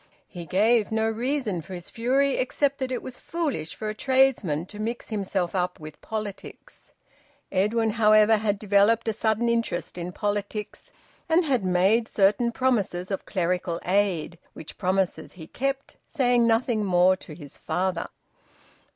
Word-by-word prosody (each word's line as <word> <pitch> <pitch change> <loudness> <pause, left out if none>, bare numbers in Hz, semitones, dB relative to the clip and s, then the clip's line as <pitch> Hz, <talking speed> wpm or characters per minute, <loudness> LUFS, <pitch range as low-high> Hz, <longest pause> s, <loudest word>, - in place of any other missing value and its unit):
He 175 -3 -9
gave 215 +5 +2
no 220 0 +1
reason 225 - -1
for 185 +4 -9
his 175 -1 -10
fury, 265 +4 +1
except 275 +2 0
that 260 -1 -3
it 255 - -3
was 255 -1 -8
foolish 290 - -3
for 215 - -5
a 215 - -2
tradesman 235 - +2
to 210 +2 -12
mix 230 +3 -4
himself 195 -4 -2
up 180 -1 -1
with 155 -1 -11
politics. 215 -3 -8 0.6
Edwin, 215 +4 +1
however, 215 0 +5
had 210 -1 0
developed 210 +3 +3
a 225 - +1
sudden 220 +2 0
interest 230 -8 -1
in 175 +1 -4
politics, 205 +1 -4 0.4
and 330 +2 +3
had 260 -8 +1
made 190 +5 +2
certain 210 +4 +2
promises 205 -8 0
of 195 - -4
clerical 180 -2 -1
aid, 180 -4 0
which 160 - -11
promises 190 -1 -1
he 165 -4 -10
kept, 275 - -4
saying 245 -5 +2
nothing 225 -1 +1
more 185 -1 +4
to 155 - -11
his 145 -4 -11
father. 180 +1 -2
210 Hz, 150 wpm, -25 LUFS, 185-235 Hz, 0.6 s, however